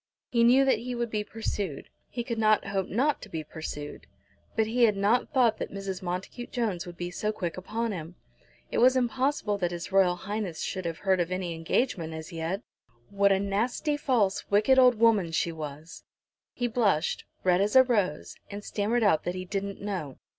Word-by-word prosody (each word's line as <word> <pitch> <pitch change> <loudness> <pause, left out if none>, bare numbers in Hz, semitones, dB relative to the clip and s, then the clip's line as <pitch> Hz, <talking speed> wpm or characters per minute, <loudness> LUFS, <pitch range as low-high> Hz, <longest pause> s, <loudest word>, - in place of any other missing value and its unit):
He 235 -1 +3
knew 255 +3 +6
that 265 - +3
he 250 +1 -4
would 235 -1 -2
be 210 -1 -1
pursued. 205 -8 -4 0.2
He 240 - -4
could 235 -1 -3
not 215 -1 +3
hope 195 -1 -1
not 280 +7 +1
to 215 - -10
be 160 -4 -4
pursued. 150 -1 -7 0.5
But 220 - +3
he 235 +2 +3
had 210 -3 +2
not 210 +5 +2
thought 240 -6 +3
that - - -4
Mrs. 195 -1 -5
Montacute 185 +7 -5
Jones 210 -8 -2
would 175 -1 -9
be 175 0 -4
so 210 +4 -1
quick 175 -6 -4
upon 225 +5 -3
him. 170 -2 -6 0.6
It - - 0
was 255 +2 +6
impossible 250 -3 0
that 175 -2 0
H.R.H 185 +1 0
should 185 -2 -3
have 165 -1 -3
heard 190 0 +1
of 175 0 -1
any 185 -2 -2
engagement 165 0 -1
as 160 0 -8
yet. 165 +6 -3 0.5
What 200 0 +3
a 195 - +3
nasty, 225 +9 0
false, 240 -9 0
wicked 215 +6 +4
old 250 -1 +6
woman 215 -6 +3
she 170 - +1
was! 155 0 -8 0.5
He 245 - -1
blushed, 210 -9 +1 0.2
red 180 0 +3
as 205 +4 0
a 260 - +9
rose, 205 - -1
and 205 0 -7
stammered 220 +4 0
out 180 -7 +3
that 175 - -2
he 185 0 -5
"didn't 200 +1 -4
know." 180 -10 -4
200 Hz, 190 wpm, -28 LUFS, 175-235 Hz, 0.6 s, a